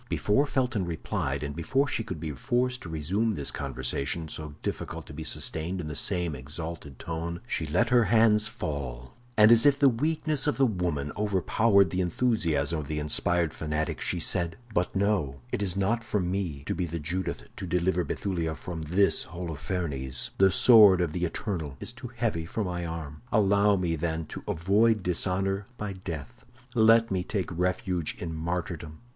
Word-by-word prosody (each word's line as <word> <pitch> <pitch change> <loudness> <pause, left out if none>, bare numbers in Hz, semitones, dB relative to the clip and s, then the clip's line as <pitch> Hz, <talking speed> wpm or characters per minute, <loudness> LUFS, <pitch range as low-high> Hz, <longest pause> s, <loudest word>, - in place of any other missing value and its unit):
Before 135 +8 +2
Felton 125 -9 0
replied, 75 -4 -3
and 70 0 -4
before 135 - +1
she 125 - -1
should 95 -7 -6
be 80 0 -4
forced 125 - -1
to 85 - -8
resume 95 +8 0
this 70 - -2
conversation, 70 +3 -2
so 75 -1 -7
difficult - - -4
to - - -11
be 80 +2 -6
sustained 80 +4 -1
in 85 - -4
the 75 -1 -5
same 90 -2 0
exalted 75 +1 -6
tone, 85 +3 -4
she 80 -10 -2
let 90 +10 +2
her 120 -2 +5
hands 110 0 +4
fall; 70 - -5 0.2
and 105 +1 +8
as 115 -1 +7
if 140 -1 +5
the 140 - +5
weakness 150 +3 0
of 150 - +1
the 135 - +5
woman 85 - -1
overpowered 100 -1 +3
the 90 - 0
enthusiasm 85 - +1
of 75 - -6
the 75 - -3
inspired 80 +2 +1
fanatic, 75 0 -2
she - - 0
said: 85 0 +1 0.2
"But 90 +1 0
no, 95 -10 0
it - - -1
is 95 -2 -1
not 110 +4 +1
for 105 -2 -1
me 90 -6 -2
to - - -1
be 90 - -2
the 85 +1 -4
Judith 90 +4 -3
to 95 - -5
deliver 90 +1 +1
Bethulia 85 -1 -2
from 85 +1 -6
this 90 +6 +2
Holofernes. 80 -6 -3
The 95 0 +7
sword 105 -3 +7
of 85 -3 0
the 90 +2 -1
eternal 80 -6 -4
is 120 - -7
too 125 +1 -8
heavy 105 -9 -1
for 110 - -2
my 90 -2 -3
arm. 80 -3 -6
Allow 100 0 +4
me, 90 -3 0
then, 80 0 -2
to - - -6
avoid 105 +5 +2
dishonor 95 +3 -1
by 105 -2 -4
death; 85 -6 -7 0.3
let 115 -1 +5
me 95 -1 0
take 95 -1 -3
refuge 90 -1 -1
in 80 -2 -5
martyrdom. 80 -1 -4
90 Hz, 180 wpm, -28 LUFS, 80-105 Hz, 0.3 s, and